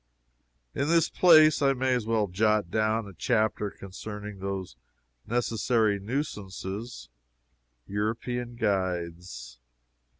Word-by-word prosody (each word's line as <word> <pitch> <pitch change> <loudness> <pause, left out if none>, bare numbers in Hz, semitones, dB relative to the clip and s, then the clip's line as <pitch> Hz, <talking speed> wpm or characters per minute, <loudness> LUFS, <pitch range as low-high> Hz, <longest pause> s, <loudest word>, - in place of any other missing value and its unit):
In 140 - -1
this 165 0 +3
place 155 -4 +6
I 135 -1 +4
may 130 0 +1
as 120 -3 -1
well 110 -2 +2
jot 105 -1 +1
down 110 0 +1
a 100 - -10
chapter 110 +2 0
concerning 105 +1 -8
those 95 -7 -4 0.5
necessary 115 -2 +1
nuisances, 105 -2 -5 0.8
European 115 +4 -3
guides. 90 - -3
110 Hz, 100 wpm, -28 LUFS, 95-120 Hz, 0.8 s, place